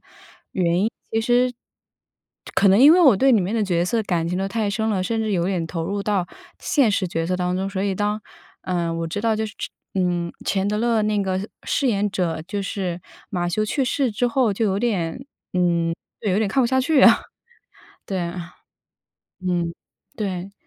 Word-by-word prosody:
其 - - -24 2.0
实 - - -15
可 200 - +5
能 195 +3 +5
因 285 +4 +9
为 360 - +5
我 270 -10 +7
对 265 +7 +4
里 225 - +5
面 190 +4 -2
的 220 - +1
角 175 -3 +1
色 225 +5 +1
感 170 -4 -1
情 180 - -2
都 195 +1 -1
太 210 +1 -1
深 220 +2 -1
了， 190 -3 0
甚 225 +2 -1
至 215 -1 -1
有 175 -2 +1
点 180 -3 -1
投 165 -1 -3
入 200 +3 -2
到 200 -3 0 0.3
现 275 -7 +2
实 195 -2 0
角 165 -1 -2
色 180 0 0
当 180 0 0
中。 190 +1 -2
所 190 -1 -3
以 200 -1 0
当， 210 +2 -1 0.4
呃， 175 -2 -1
我 165 0 -2
知 190 +5 -4
道 225 0 +2
就 220 +1 -1
是 220 - -8 0.4
嗯， 175 -2 0
钱 195 0 0
德 210 - 0
勒 230 -2 +2
那 210 -1 +1
个 190 -1 -1 0.3
饰 285 - 0
演 205 -3 +1
者， 175 -5 -1
就 200 +2 -3
是 185 -3 -3 0.3
马 175 -4 -1
修 195 +5 0
去 265 +5 0
世 265 0 +1
之 245 +4 0
后 240 -2 +2
就 220 +3 0
有 195 -2 +1
点， 210 0 -1 0.3
嗯， 170 -2 +1 0.3
就 210 - -1
有 185 - +2
点 220 - +2
看 265 - +2
不 240 - +2
下 260 +1 +2
去 285 +1 +3
啊。 - - +8 0.9
对 190 - -2
啊。 175 0 -6 0.9
嗯， 170 -2 0 0.4
对。 195 -3 -3
195 Hz, 215 characters per minute, -22 LUFS, 180-220 Hz, 2.0 s, 因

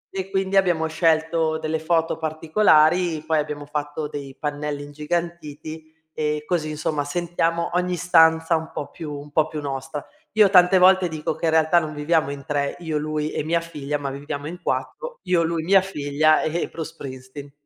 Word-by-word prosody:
e 190 0 -3
quindi 195 0 0
abbiamo 175 -4 +3
scelto 160 0 +1
delle 155 0 -2
foto 165 0 0
particolari, 160 0 +3
poi 160 -1 +2
abbiamo 150 -1 -4
fatto 150 +1 -4
dei 140 -2 -7
pannelli 145 -1 -3
ingigantiti 155 +1 -5 0.2
e 150 -1 -1
così, 160 -3 -1
insomma, 150 -1 -2
sentiamo 170 +2 -1
ogni 180 0 0
stanza 165 -1 +4
un 160 0 -3
po' 145 - -5
più 155 -2 -7
un 145 0 -8
po' 155 0 +2
più 155 -1 -5
nostra. 140 +1 -5 0.3
Io 210 -3 +6
tante 180 0 +6
volte 185 0 +6
dico 155 -1 -3
che - - -4
in 160 - +3
realtà 160 +2 +4
non 155 -2 -5
viviamo 155 0 +1
in 140 -1 -7
3, 140 -1 -1
io 160 -3 -2
lui 155 0 -2
e - - -2
mia 165 +2 +1
figlia, 150 -3 -4
ma 140 -1 -4
viviamo 145 +1 -5
in 175 +3 -8
4, - - -3
io, 170 -2 +2
lui, 165 -1 -1
mia 195 +2 +5
figlia 155 -4 +2
e 165 +2 -1
e - - -1
Bruce 165 0 -7
Springsteen. 135 0 -9
155 Hz, 185 wpm, -23 LUFS, 150-170 Hz, 0.3 s, Io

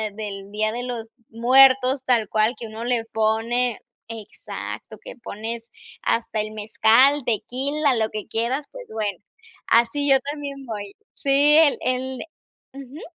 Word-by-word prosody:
del 200 -2 -6
Día 215 +1 0
de 240 +2 -4
los 235 -3 -5 0.2
Muertos 260 +3 +5
tal 235 -4 +2
cual, 215 +2 +2
que 235 - -6
uno 220 +1 -7
le 240 -2 0
pone 225 +2 0 0.3
exacto, 225 -2 -8
que - - -9
pones 230 +2 -6 0.3
hasta 230 - 0
el 215 0 -5
mezcal, 220 +6 +4
tequila, 265 +6 0
lo 220 -1 0
que 215 -2 -6
quieras, 245 +6 -1
pues - - -10
bueno, 210 -4 -3 0.5
así 240 +5 +2
yo 270 - +7
también 280 -2 -7
voy. 205 -4 -6 0.2
Sí, 285 +2 +4
el 310 -3 +4
el 255 0 -2 0.5
ujú. 275 +2 -10
235 Hz, 140 wpm, -23 LUFS, 220-270 Hz, 0.5 s, yo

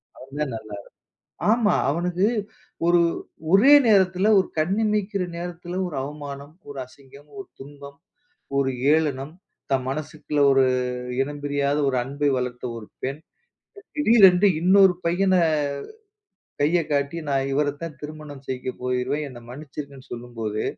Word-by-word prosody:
அவன் 135 +3 -12
தான் 140 -5 -1
நல்லா 110 -1 -9 0.5
இருப்பான். - - -73
ஆமா. 225 -2 +3 0.2
அவனுக்கு 175 +5 0 0.6
ஒரு, 175 0 +5 0.5
ஒரே 225 +9 +7 0.2
நேரத்தில 190 -1 +4
ஒரு 190 - +1
கண்ணு 185 +7 +1
இமைக்கிற 210 -2 0
நேரத்தில 175 +1 -6
ஒரு 165 -5 -6
அவமானம், 145 +1 -8
ஒரு 140 -1 -8
அசிங்கம், 140 +2 -18
ஒரு 200 - -8
துன்பம், 140 0 -11 0.6
ஒரு 135 -1 +2 0.2
ஏளனம். 150 -1 -1 0.4
"தன் 130 -1 +1
மனசுக்குள்ள 150 +1 -3
ஒரு 135 0 +4 0.6
இனம் 145 +1 -3
பிரியாத 145 0 0
ஒரு 130 - 0
அன்பை 140 +3 -1
வளர்த்த 125 -1 -4
ஒரு 105 - -10 0.2
பெண், 135 +3 -3 0.8
திடீரென்று 205 -8 +6
இன்னொரு 190 +1 +6
பையன 185 +3 +2 1.3
கைய 160 +5 +3
காட்டி 140 +2 0
நா 140 - 0 0.2
இவரை 145 +1 +1
தான் 160 -3 -6
திருமணம் 150 -2 -9
செய்ய 130 0 -3
போகிறேன், 125 +4 -1
என்னை 125 -3 -11
மன்னிச்சுருங்கன்னு 140 0 -9
சொல்லும்போது, 115 -3 -4
145 Hz, 130 wpm, -24 LUFS, 135-175 Hz, 1.3 s, ஒரே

